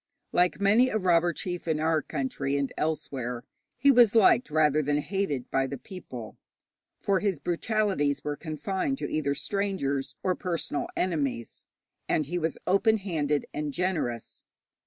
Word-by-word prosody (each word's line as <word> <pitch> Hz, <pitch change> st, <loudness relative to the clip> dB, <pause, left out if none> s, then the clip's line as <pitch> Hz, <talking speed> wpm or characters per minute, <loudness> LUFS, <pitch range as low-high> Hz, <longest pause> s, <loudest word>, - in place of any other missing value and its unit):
Like 180 Hz, +1 st, +2 dB
many 215 Hz, +6 st, +4 dB
a 220 Hz, -, 0 dB
robber 175 Hz, -3 st, +3 dB
chief 175 Hz, +1 st, -5 dB
in 155 Hz, -2 st, +1 dB
our 160 Hz, 0 st, +2 dB
country 140 Hz, -1 st, -2 dB
and 140 Hz, -1 st, -2 dB
elsewhere, 130 Hz, -6 st, -3 dB, 0.3 s
he 280 Hz, +3 st, +5 dB
was 240 Hz, -4 st, +6 dB
liked 225 Hz, +1 st, +5 dB
rather 155 Hz, -1 st, +3 dB
than 145 Hz, 0 st, +1 dB
hated 150 Hz, -6 st, -2 dB
by 135 Hz, 0 st, +1 dB
the 140 Hz, -, -5 dB
people, 125 Hz, -, -9 dB, 0.6 s
for 195 Hz, -2 st, +1 dB
his 195 Hz, -7 st, 0 dB
brutalities 175 Hz, -3 st, 0 dB
were 150 Hz, 0 st, -2 dB
confined 185 Hz, -, -2 dB
to -, -, -3 dB
either 140 Hz, -2 st, 0 dB
strangers 190 Hz, -11 st, -2 dB
or 185 Hz, -, +2 dB
personal 170 Hz, -5 st, -2 dB
enemies, 140 Hz, -10 st, -2 dB, 0.4 s
and 155 Hz, -, +2 dB
he 175 Hz, +5 st, -2 dB
was 160 Hz, -1 st, -2 dB
open 220 Hz, +4 st, +3 dB
handed 155 Hz, -7 st, -1 dB
and 150 Hz, -1 st, -3 dB
generous. 165 Hz, -11 st, -2 dB
160 Hz, 150 wpm, -28 LUFS, 145-195 Hz, 0.6 s, was